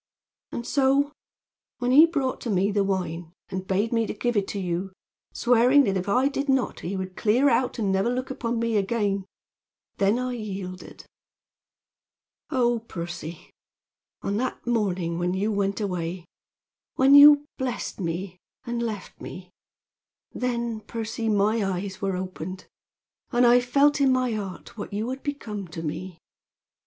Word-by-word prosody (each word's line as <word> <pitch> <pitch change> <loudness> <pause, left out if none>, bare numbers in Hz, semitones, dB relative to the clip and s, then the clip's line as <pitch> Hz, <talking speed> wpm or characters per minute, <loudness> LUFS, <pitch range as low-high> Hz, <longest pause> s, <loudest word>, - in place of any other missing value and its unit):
And 235 - -5
so, 280 +1 +2 0.7
when 250 -1 0
he 305 +5 +8
brought 280 -6 -2
to 235 - -4
me 195 0 +2
the 200 0 +2
wine, 175 -4 -3 0.2
and 190 0 -5
bade 205 +5 0
me 230 -1 +1
to - - -4
give 240 +2 -1
it 200 -2 +1
to 200 - -4
you, 185 +1 -3 0.4
swearing 250 +4 +4
that 195 -6 0
if 185 +1 -2
I 250 +6 +3
did 280 0 -2
not 265 -2 +1
he 190 +3 -4
would 185 -1 -5
clear 245 +6 +3
out 250 +2 +1
and 205 -4 0
never 195 +4 +2
look 255 +2 -2
upon 235 -2 -2
me 230 -1 +1
again, 200 -1 0 0.7
then 200 +3 +3
I 250 0 -2
yielded. 195 -5 -7 1.4
"Oh, 240 -2 +2
Percy! 170 -6 -7 0.7
On 200 +1 -1
that 255 +3 -3
morning 185 -8 0
when 175 +1 0
you 205 +3 0
went 200 0 0
away 180 -3 -3 0.7
when 265 +1 +5
you 290 0 +9
blessed 255 -4 -3
me 180 +1 -3 0.3
and 240 0 -2
left 215 -5 -5
me 180 0 -9 0.8
then, 235 -2 -2
Percy, 225 0 -4
my 210 +1 +2
eyes 190 0 -3
were 195 -2 -1
opened, 185 0 -6 0.7
and 245 -1 +4
I 240 +1 +7
felt 280 +4 +3
in 270 -1 +5
my 255 -1 +1
heart 200 -4 -6
what 205 - -6
you 215 +3 -2
had 265 +1 -5
become 215 -9 -5
to 165 0 -7
me. 175 +3 -5
215 Hz, 155 wpm, -25 LUFS, 190-245 Hz, 1.4 s, you